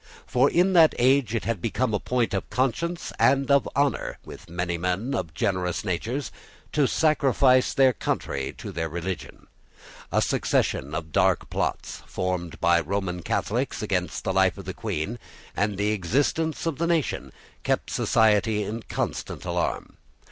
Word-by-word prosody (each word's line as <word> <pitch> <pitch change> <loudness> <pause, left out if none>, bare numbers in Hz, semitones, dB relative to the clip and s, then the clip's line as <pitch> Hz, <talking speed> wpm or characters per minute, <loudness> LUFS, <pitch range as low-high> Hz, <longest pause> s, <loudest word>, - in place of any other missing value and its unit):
For 130 +3 +3
in 180 +2 +3
that 165 -3 +6
age 130 -1 +3
it 115 - -2
had 115 -6 -1
become 115 +2 0
a 105 - +1
point 125 -3 0
of 95 - -2
conscience 150 +7 -1
and 135 +1 +3
of 140 0 +4
honour 140 0 0
with - - -11
many 85 0 -2
men 90 +9 -1
of 80 - -3
generous 90 -3 -1
natures 115 +10 -2 0.4
to 145 -3 +3
sacrifice 135 -4 +3
their 135 -3 +5
country 70 - -2
to - - -7
their 80 0 -3
religion. 85 +3 -5 0.7
A - - +3
succession 70 +3 0
of 80 -1 -5
dark - - +2
plots, - - -2
formed 90 -2 -3
by 85 -1 +4
Roman 90 +1 -2
Catholics - - -1
against - - -2
the 95 - -1
life 95 -1 +3
of 100 - -9
the 95 - -4
Queen 105 +3 -3 0.4
and 105 -1 0
the 105 +1 +1
existence 140 - 0
of 165 -4 -2
the 170 - +1
nation, 165 -4 0 0.3
kept - - -1
society 105 -1 +3
in 110 +3 -4
constant - - -3
alarm. - - -2
110 Hz, 155 wpm, -25 LUFS, 90-135 Hz, 0.7 s, that